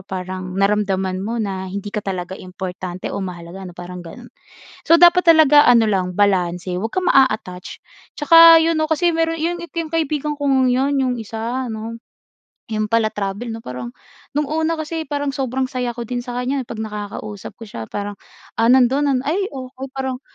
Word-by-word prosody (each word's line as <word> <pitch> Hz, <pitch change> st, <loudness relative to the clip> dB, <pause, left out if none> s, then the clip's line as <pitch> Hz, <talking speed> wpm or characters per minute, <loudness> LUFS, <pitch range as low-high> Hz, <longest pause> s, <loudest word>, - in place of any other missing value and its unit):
parang 185 Hz, -1 st, -6 dB
naramdaman 195 Hz, -2 st, 0 dB
mo 220 Hz, +4 st, -3 dB
na 190 Hz, -4 st, -3 dB
hindi 200 Hz, +2 st, -6 dB
ka 210 Hz, -, -2 dB
talaga 185 Hz, -2 st, -4 dB
importante 185 Hz, -1 st, -6 dB
o -, -, -3 dB
mahalaga 180 Hz, 0 st, -7 dB
ano, 175 Hz, -, -13 dB
parang 180 Hz, 0 st, -8 dB
ganun. 165 Hz, -1 st, -12 dB, 0.5 s
So, 325 Hz, -, +4 dB
dapat 350 Hz, +1 st, +7 dB
talaga 300 Hz, -2 st, +6 dB
ano 230 Hz, -3 st, +5 dB
lang, 185 Hz, -3 st, 0 dB
balanse. 180 Hz, -2 st, +1 dB
'Wag 225 Hz, +5 st, -4 dB
kang 370 Hz, -1 st, 0 dB
maa-aattach. 215 Hz, -9 st, +1 dB, 0.3 s
Tsaka 330 Hz, +2 st, +8 dB
yun 330 Hz, 0 st, +1 dB
'no, 315 Hz, -, +2 dB
kasi 320 Hz, +2 st, +1 dB
meron 330 Hz, -1 st, 0 dB
yun 345 Hz, +2 st, -1 dB
yung 330 Hz, -1 st, -5 dB
kaibigan 300 Hz, -2 st, -1 dB
kong 270 Hz, -3 st, +2 dB
yun, 265 Hz, +3 st, +1 dB
yung 255 Hz, -1 st, 0 dB
isa 230 Hz, +3 st, -4 dB
ano, 225 Hz, 0 st, -6 dB, 0.7 s
'yung 215 Hz, -1 st, -1 dB
pala-travel 215 Hz, 0 st, -1 dB
'no. 225 Hz, -, -4 dB
Parang 125 Hz, -, -7 dB, 0.5 s
nung 300 Hz, -, +1 dB
una 320 Hz, +2 st, -1 dB
kasi 315 Hz, +1 st, -4 dB
parang 285 Hz, -1 st, -2 dB
sobrang 265 Hz, -1 st, -1 dB
saya 255 Hz, -1 st, -3 dB
ko 235 Hz, -, -4 dB
din 245 Hz, +1 st, -3 dB
sa 245 Hz, 0 st, -6 dB
kanya 260 Hz, +2 st, -1 dB
'pag 235 Hz, -2 st, -8 dB
nakakausap 210 Hz, -1 st, -6 dB
ko 225 Hz, -, -9 dB
siya 115 Hz, -, -8 dB
parang, 205 Hz, 0 st, -4 dB, 0.4 s
ah, 230 Hz, +1 st, +2 dB
nandun 265 Hz, +2 st, +4 dB
ay 385 Hz, +7 st, 0 dB
oo, 260 Hz, -1 st, -9 dB, 0.2 s
parang 265 Hz, -1 st, -3 dB
230 Hz, 175 wpm, -20 LUFS, 195-285 Hz, 0.7 s, Tsaka